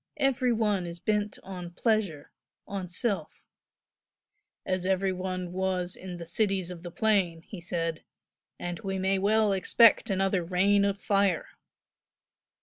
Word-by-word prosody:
Every 255 -2 +2
one 210 -5 +1
is 170 0 -7
bent 210 +1 -1
on 180 -2 -7
pleasure 195 -8 0 0.3
on 195 -3 -5
self 200 +3 -2 0.6
" - - -55
"As 185 - -5
every 190 +1 +1
one 185 -1 -4
was 185 -1 -1
in 180 -1 -8
the 170 - -7
'Cities 190 -1 0
of 175 -2 -8
the 175 - -7
Plain,'" 185 -4 +1
he 195 -2 -9
said, 165 -2 -2 0.5
"and 175 0 -5
we 195 -3 -3
may 190 +1 +1
well 210 +1 +3
expect 220 +5 +5
another 195 -1 +1
rain 195 +3 +3
of 200 0 -1
fire!" 200 -5 +1
190 Hz, 145 wpm, -28 LUFS, 180-205 Hz, 0.6 s, expect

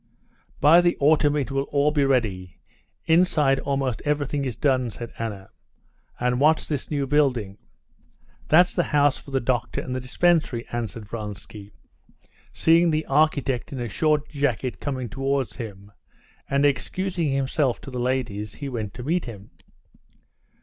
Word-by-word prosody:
"By 160 +5 +7
the 175 0 +1
autumn 150 0 +3
it 140 -2 -1
will 135 0 -1
all 145 +1 +2
be 145 -2 +2
ready. 105 -10 0 0.5
Inside 155 -5 +3
almost 135 -4 -2
everything 145 -1 -1
is 125 -4 -3
done," 130 -4 +1
said 115 +1 -8
Anna. 105 -4 -5 0.7
"And 125 0 0
what's 155 +3 +3
this 145 -4 -4
new 145 -2 -1
building?" 130 -9 +1 0.9
"That's 175 +3 +5
the 175 - +1
house 145 -1 +4
for - - -14
the 135 -1 0
doctor 120 -2 -1
and 125 - -4
the - - -1
dispensary," 130 -2 +1
answered 115 -2 -4
Vronsky, 105 -1 -8 0.8
seeing 165 +1 +4
the 155 0 0
architect 140 -3 +1
in 135 - -5
a 120 - -3
short 150 +6 +1
jacket 130 -7 -2
coming 130 -4 -3
towards 135 -1 -2
him; 100 -4 -8 0.6
and 140 +1 +2
excusing 175 +4 -1
himself 135 -1 0
to 135 - -9
the 125 - -4
ladies, 115 -5 -2
he 140 +4 -6
went 110 -6 -5
to 125 - -7
meet 170 +6 0
him. 105 -4 -10
135 Hz, 150 wpm, -24 LUFS, 120-150 Hz, 0.9 s, By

